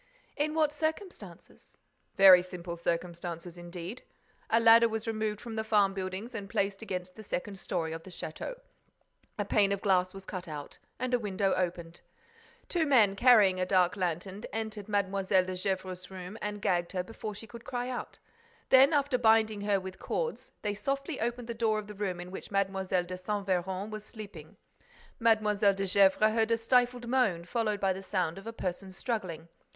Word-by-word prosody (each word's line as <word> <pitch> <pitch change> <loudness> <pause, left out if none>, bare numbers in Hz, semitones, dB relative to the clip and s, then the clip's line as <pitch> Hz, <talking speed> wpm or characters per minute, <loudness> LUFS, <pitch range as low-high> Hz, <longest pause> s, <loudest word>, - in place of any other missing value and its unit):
"In 305 +1 -1
what 305 -2 +2
circumstances?" 320 +5 -6 0.4
"Very 190 -2 +9
simple 180 -1 -7
circumstances, 170 0 -3
indeed. 175 +5 -7 0.5
A 225 - +4
ladder 230 0 +7
was 220 0 -3
removed 215 -2 -2
from 230 0 -7
the 220 - -1
farm 205 -3 +3
buildings 190 +5 -5
and 200 -3 -6
placed 195 0 -1
against 185 -4 -5
the 220 - -9
second 195 -1 -4
story 165 -4 -2
of 165 - -6
the 190 - -12
château. 185 - -6 0.8
A 205 - -1
pane 200 -1 +3
of 200 - 0
glass 185 -2 +3
was 195 0 -10
cut 185 -2 -6
out 150 -2 -8 0.2
and 255 0 -3
a 245 - +4
window 195 -2 0
opened. 175 -2 -3 0.7
Two 330 -3 +1
men, 220 -8 +5
carrying 205 -5 +6
a 185 - +1
dark 185 -1 +3
lantern, 185 +2 -3
entered 220 -2 -4
Mlle. 200 -1 0
de 185 -1 +2
Gesvres's 185 -1 -3
room 185 +1 -8
and 210 -1 -4
gagged 175 -1 +1
her 180 -1 -1
before 215 +1 -7
she 210 - -9
could 235 +2 -11
cry 245 0 -3
out. 255 -1 -5 0.5
Then, 265 +4 +7
after 280 -3 +2
binding 220 -2 +4
her 205 -1 +2
with 190 0 -8
cords, 475 -1 -3
they 205 -1 0
softly 275 +6 -3
opened 240 +1 -2
the 235 - -3
door 225 -1 +1
of 215 - -4
the 210 - -9
room 195 -3 -3
in 175 +1 -8
which 190 - -8
Mlle. 195 -1 0
de 185 -1 -1
Saint 200 +2 -3
Véran 190 +2 -1
was 215 -1 -6
sleeping. 215 -2 -11 0.6
Mlle. 215 -3 +3 0.2
de 195 0 -2
Gesvres 195 +3 +4
heard 225 0 +2
a 230 - +3
stifled 245 +1 +2
moan, 225 -10 +1
followed 215 +1 -1
by 195 -1 +2
the 190 - -7
sound 185 -3 -1
of 195 - -12
a - - -3
person 190 -3 -4
struggling. 185 -6 -4
200 Hz, 185 wpm, -30 LUFS, 185-225 Hz, 0.8 s, Very